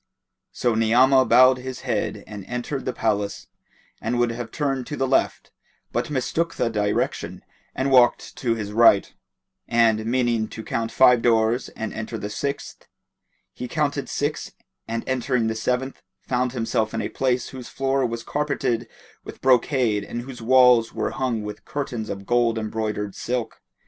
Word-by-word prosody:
So 120 Hz, -2 st, 0 dB
Ni'amah 125 Hz, +4 st, +4 dB
bowed 130 Hz, +2 st, +6 dB
his 130 Hz, 0 st, -7 dB
head 120 Hz, -6 st, -2 dB
and 105 Hz, -2 st, -8 dB
entered 125 Hz, +3 st, -4 dB
the 130 Hz, -, 0 dB
palace, 105 Hz, -4 st, -1 dB, 0.6 s
and 115 Hz, +2 st, -1 dB
would 120 Hz, -1 st, +2 dB
have 115 Hz, 0 st, -5 dB
turned 135 Hz, -2 st, -2 dB
to 145 Hz, -, -5 dB
the 135 Hz, -, 0 dB
left, 130 Hz, -, 0 dB, 0.4 s
but -, -, -2 dB
mistook 155 Hz, +5 st, -1 dB
the 115 Hz, -, 0 dB
direction 105 Hz, -1 st, -1 dB, 0.3 s
and 135 Hz, +1 st, 0 dB
walked 125 Hz, -2 st, +4 dB
to 115 Hz, -3 st, 0 dB
his 105 Hz, -2 st, -5 dB
right; 110 Hz, -2 st, +5 dB, 0.5 s
and, 115 Hz, -2 st, +2 dB
meaning 120 Hz, -2 st, +1 dB
to 110 Hz, -, -8 dB
count 115 Hz, 0 st, -2 dB
five 125 Hz, -2 st, +5 dB
doors 115 Hz, +1 st, +2 dB
and 110 Hz, -, -4 dB
enter 110 Hz, +1 st, -5 dB
the 105 Hz, 0 st, -5 dB
sixth, 140 Hz, +5 st, -5 dB, 0.7 s
he 125 Hz, -, -6 dB
counted 145 Hz, -2 st, -1 dB
six 145 Hz, +1 st, -3 dB, 0.3 s
and 115 Hz, 0 st, -3 dB
entering 125 Hz, -2 st, 0 dB
the 110 Hz, -, 0 dB
seventh, 125 Hz, +4 st, -2 dB, 0.2 s
found 125 Hz, 0 st, -1 dB
himself 115 Hz, -2 st, -1 dB
in -, -, -1 dB
a -, -, -1 dB
place 125 Hz, -2 st, -1 dB
whose 130 Hz, -2 st, -9 dB
floor 135 Hz, 0 st, 0 dB
was 115 Hz, -1 st, -2 dB
carpeted 145 Hz, -5 st, -1 dB, 0.4 s
with -, -, -10 dB
brocade 125 Hz, -4 st, +2 dB
and 120 Hz, +3 st, -5 dB
whose 125 Hz, -2 st, -9 dB
walls 125 Hz, -1 st, +5 dB
were -, -, -1 dB
hung 125 Hz, -5 st, -2 dB
with 105 Hz, 0 st, -7 dB
curtains 135 Hz, -7 st, -4 dB
of 100 Hz, 0 st, -6 dB
gold 120 Hz, -1 st, +2 dB
embroidered 110 Hz, -2 st, -3 dB
silk. 120 Hz, -2 st, -4 dB
120 Hz, 160 wpm, -23 LUFS, 110-130 Hz, 0.7 s, bowed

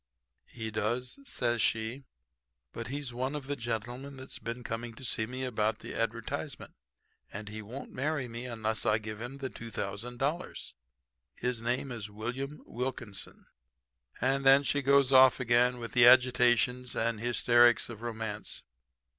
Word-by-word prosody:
"'He 110 Hz, -2 st, -6 dB
does,' 120 Hz, -, -2 dB
says 120 Hz, -, 0 dB
she. 115 Hz, +5 st, 0 dB, 0.7 s
'But -, -, -5 dB
he's 140 Hz, -1 st, -4 dB
one 130 Hz, +4 st, -2 dB
of 145 Hz, -2 st, -4 dB
the 145 Hz, +1 st, -2 dB
gentlemen 120 Hz, +4 st, -4 dB
that's 130 Hz, 0 st, -7 dB
been 120 Hz, +1 st, -5 dB
coming 115 Hz, 0 st, -4 dB
to 130 Hz, -, -9 dB
see 110 Hz, -2 st, -1 dB
me 130 Hz, +2 st, -5 dB
about 110 Hz, -3 st, 0 dB
the -, -, -8 dB
advertisement -, -, -3 dB, 0.6 s
and 105 Hz, 0 st, -6 dB
he 110 Hz, +1 st, -6 dB
won't 120 Hz, +6 st, -8 dB
marry 145 Hz, 0 st, -1 dB
me 120 Hz, +2 st, -6 dB
unless 110 Hz, -2 st, -2 dB
I 105 Hz, -, +3 dB
give 110 Hz, 0 st, -7 dB
him 125 Hz, +3 st, -6 dB
the 135 Hz, -2 st, -4 dB
$2,000. 120 Hz, -, -4 dB, 0.6 s
His 125 Hz, -2 st, -2 dB
name 125 Hz, +3 st, -1 dB
is 110 Hz, -4 st, -5 dB
William 125 Hz, +8 st, -5 dB
Wilkinson.' 115 Hz, -5 st, -5 dB, 0.7 s
And 135 Hz, +1 st, +1 dB
then 135 Hz, +1 st, +7 dB
she 145 Hz, +1 st, +1 dB
goes 140 Hz, -1 st, +4 dB
off 130 Hz, 0 st, +7 dB
again 125 Hz, 0 st, +3 dB
in 115 Hz, -3 st, -6 dB
the 120 Hz, 0 st, +7 dB
agitations 125 Hz, -1 st, +4 dB
and 115 Hz, -1 st, 0 dB
hysterics 120 Hz, 0 st, +4 dB
of 115 Hz, -2 st, -9 dB
romance. 110 Hz, -3 st, -4 dB
120 Hz, 150 wpm, -31 LUFS, 115-130 Hz, 0.7 s, then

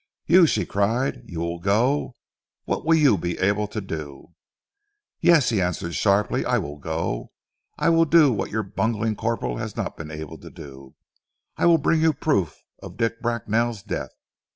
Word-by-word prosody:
"You!" 175 Hz, +1 st, +6 dB
she 105 Hz, -, 0 dB
cried, 115 Hz, +8 st, 0 dB
"you 85 Hz, -2 st, -5 dB
will 85 Hz, 0 st, -3 dB
go? 120 Hz, +8 st, +1 dB, 0.5 s
What -, -, -2 dB
will 165 Hz, +1 st, +4 dB
you 145 Hz, -10 st, +4 dB
be 85 Hz, -1 st, -3 dB
able 100 Hz, +2 st, +1 dB
to 105 Hz, -, -5 dB
do?" 80 Hz, -5 st, -8 dB, 0.9 s
"Yes," 170 Hz, -6 st, +4 dB
he 110 Hz, -5 st, +1 dB
answered 85 Hz, -1 st, -2 dB
sharply. 100 Hz, +2 st, +1 dB
"I -, -, +1 dB
will 75 Hz, +1 st, -5 dB
go. 80 Hz, -5 st, -3 dB, 0.5 s
I -, -, +2 dB
will 165 Hz, 0 st, +4 dB
do 155 Hz, -4 st, +5 dB
what 100 Hz, -, -3 dB
your 110 Hz, 0 st, -2 dB
bungling 110 Hz, +2 st, -1 dB
corporal 100 Hz, -, -2 dB
has -, -, -5 dB
not -, -, -4 dB
been 80 Hz, -1 st, -7 dB
able 80 Hz, 0 st, -8 dB
to -, -, -11 dB
do. 65 Hz, -1 st, -12 dB, 0.6 s
I -, -, +2 dB
will 170 Hz, -1 st, +6 dB
bring 160 Hz, +2 st, +1 dB
you 160 Hz, -1 st, +4 dB
proof 100 Hz, -, -1 dB, 0.2 s
of -, -, -10 dB
Dick 115 Hz, 0 st, -1 dB
Bracknell's 115 Hz, -2 st, -1 dB
death. -, -, -5 dB
105 Hz, 175 wpm, -23 LUFS, 85-130 Hz, 0.9 s, You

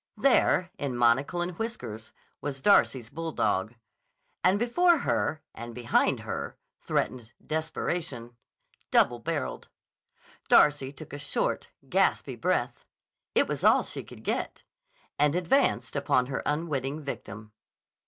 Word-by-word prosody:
There, 210 Hz, -7 st, +3 dB
in 135 Hz, -4 st, -2 dB
monocle 130 Hz, +8 st, +2 dB
and 175 Hz, -, -3 dB
whiskers, 115 Hz, -, -5 dB, 0.3 s
was 140 Hz, -2 st, -4 dB
Darcy's 130 Hz, -, +4 dB
bulldog. 120 Hz, -10 st, -1 dB, 0.7 s
And 185 Hz, +2 st, +4 dB
before 335 Hz, +10 st, +3 dB
her 155 Hz, -, -1 dB
and 115 Hz, 0 st, -8 dB
behind 120 Hz, -1 st, +1 dB
her -, -, -5 dB, 0.2 s
threatened 120 Hz, -2 st, -2 dB
Desperation, 155 Hz, -6 st, -3 dB, 0.5 s
double 120 Hz, -1 st, +3 dB
barreled. 150 Hz, +3 st, -4 dB, 0.8 s
Darcy 145 Hz, -3 st, +5 dB
took 140 Hz, -, -12 dB
a 145 Hz, -, -5 dB
short, 145 Hz, -, -1 dB, 0.2 s
gaspy -, -, +1 dB
breath—it -, -, -2 dB
was -, -, -4 dB
all -, -, +5 dB
she -, -, -6 dB
could -, -, -13 dB
get—and 150 Hz, +1 st, -3 dB
advanced 180 Hz, -, +1 dB
upon 140 Hz, -3 st, +2 dB
her 135 Hz, +1 st, -3 dB
unwitting 150 Hz, -1 st, -2 dB
victim. 110 Hz, -5 st, -7 dB
145 Hz, 115 wpm, -28 LUFS, 120-170 Hz, 0.8 s, Darcy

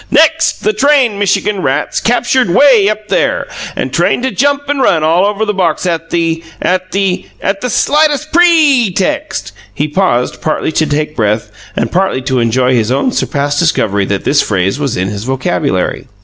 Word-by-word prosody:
NEXT, 320 Hz, +2 st, +2 dB
the 215 Hz, -, +1 dB
trained 255 Hz, -3 st, +2 dB
Michigan 200 Hz, 0 st, 0 dB
rats, -, -, -1 dB
captured 245 Hz, -1 st, +1 dB
way 220 Hz, 0 st, +4 dB
up 215 Hz, 0 st, -4 dB
there, -, -, 0 dB, 0.3 s
and -, -, -4 dB
trained -, -, +1 dB
to 260 Hz, -, 0 dB
jump 285 Hz, +6 st, 0 dB
and 285 Hz, -1 st, -1 dB
run 160 Hz, -10 st, +2 dB
all 170 Hz, +5 st, +3 dB
around 210 Hz, +1 st, -1 dB
the 210 Hz, -, -1 dB
box 180 Hz, -3 st, -1 dB
at 165 Hz, -2 st, -2 dB
the 165 Hz, -1 st, -1 dB, 0.2 s
at 185 Hz, 0 st, -1 dB
the 195 Hz, -2 st, -1 dB
at 195 Hz, 0 st, -2 dB
the 250 Hz, -, -2 dB
slightest 300 Hz, +4 st, +1 dB
PRE 310 Hz, -, +4 dB
text!" 100 Hz, -, -2 dB, 0.2 s
He 145 Hz, +9 st, -2 dB
paused, 150 Hz, -7 st, -1 dB
partly 155 Hz, 0 st, -1 dB
to 155 Hz, 0 st, 0 dB
take 150 Hz, +1 st, -2 dB
breath 105 Hz, -2 st, -1 dB, 0.2 s
and 115 Hz, -, -2 dB
partly 185 Hz, -8 st, 0 dB
to 130 Hz, -1 st, 0 dB
enjoy 125 Hz, +2 st, +1 dB
his 115 Hz, -1 st, +1 dB
own 195 Hz, -, 0 dB
surprised 145 Hz, -7 st, -1 dB
discovery 105 Hz, -, +1 dB
that 100 Hz, 0 st, -2 dB
this 145 Hz, -, +2 dB
phrase 95 Hz, +4 st, -1 dB
was 140 Hz, -4 st, -2 dB
in 90 Hz, +1 st, -1 dB
his 105 Hz, 0 st, -5 dB
vocabulary. 130 Hz, 0 st, -2 dB
185 Hz, 180 wpm, -13 LUFS, -, 0.3 s, way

